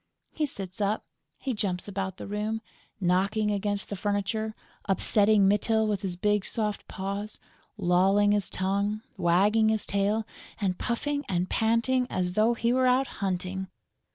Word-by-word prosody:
He 305 -1 0
sits 195 -5 -7
up, 205 +2 0 0.3
he 265 - -3
jumps 190 -4 -2
about 190 -2 -3
the - - -7
room, 215 +2 -2 0.4
knocking 200 +4 +1
against 205 0 -1
the - - -1
furniture, 205 +2 -1 0.3
upsetting 205 +1 +4
Mytyl 220 +2 +2
with 205 -2 -1
his 190 -3 -2
big 210 +2 +1
soft 210 -2 -2
paws, 200 +2 -4 0.4
lolling 195 +2 +3
his 205 -1 +1
tongue, 200 +3 -1
wagging 205 +6 +3
his 220 -1 0
tail 205 +2 +1 0.3
and 190 -3 -1
puffing 285 +4 -1
and 180 0 -1
panting 230 +3 +2
as 180 -1 -1
though 220 +4 +3
he 235 +1 +1
were 255 0 +3
out 255 +2 +4 0.2
hunting. 190 0 -2
205 Hz, 150 wpm, -28 LUFS, 190-220 Hz, 0.4 s, upsetting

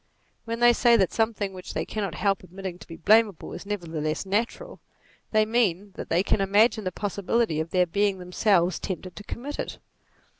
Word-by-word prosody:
When 230 +1 -4
they 240 0 +7
say 235 0 +5
that 190 -4 +1
something 220 -3 0
which 185 -1 -8
they - - -1
cannot 200 -6 -3
help 195 +1 +1
admitting 185 0 -7
to - - -13
be 165 - -8
blamable, 210 +1 +3
is - - -8
nevertheless 160 -5 -3
natural, 230 - -2 0.5
they 215 -1 +3
mean 205 -4 +1
that - - -8
they 170 +3 +2
can 200 - +1
imagine 210 +2 +3
the 185 - -1
possibility 200 -2 -1
of 160 +1 -2
their 180 0 +3
being 200 +3 +1
themselves 180 -1 +1
tempted 185 -1 -5
to 205 - -9
commit 275 +7 -6
it. - - -4
200 Hz, 185 wpm, -26 LUFS, 180-220 Hz, 0.5 s, they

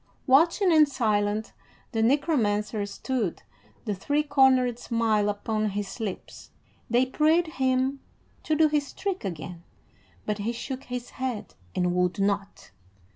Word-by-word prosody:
Watching 335 +7 +4
and 305 -2 +6
silent 215 -4 0 0.4
the 225 - 0
Necromancer 225 -6 +1
stood, 215 -2 -3 0.4
the 210 - -1
three 285 +10 0
cornered 260 -4 +3
smile 225 -4 +1
upon 215 +1 -1
his 200 +2 -5
lips. 210 -5 -6 0.4
They 240 +2 +3
prayed 310 +6 +3
him 265 -2 0 0.4
to 310 - 0
do 315 +1 +5
his 295 -2 -1
trick 390 -2 -3
again, 170 -1 -6 0.6
but 210 0 -2
he 220 +4 -2
shook 260 +3 -6
his 245 -1 -6
head 255 -5 -4 0.2
and 180 -1 +1
would 180 +1 +1
not. 200 - -2
235 Hz, 130 wpm, -26 LUFS, 205-280 Hz, 0.6 s, and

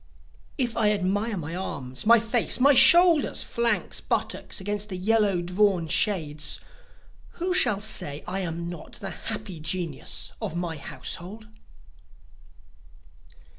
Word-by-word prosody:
If 240 -3 -1
I 220 -3 +3
admire 205 +2 -1
my 165 0 -5
arms, 140 -4 -5
my 235 +1 +8
face, 230 +2 +1
my 280 +3 +6
shoulders, 340 +3 +6
flanks, 235 0 -1
buttocks - - -2
against 205 +2 -3
the 185 - -4
yellow 200 -2 +2
drawn 180 -1 +1
shades, 155 -6 0 0.7
Who 360 +1 -2
shall 215 - +3
say 150 -9 -5
I 185 +2 -3
am 170 -2 -4
not 175 -1 -9
the 195 -1 -5
happy 195 -4 -6
genius 160 -3 -3
of 160 - -4
my 170 -2 -3
household? 195 +8 -6
195 Hz, 125 wpm, -26 LUFS, 170-225 Hz, 0.7 s, my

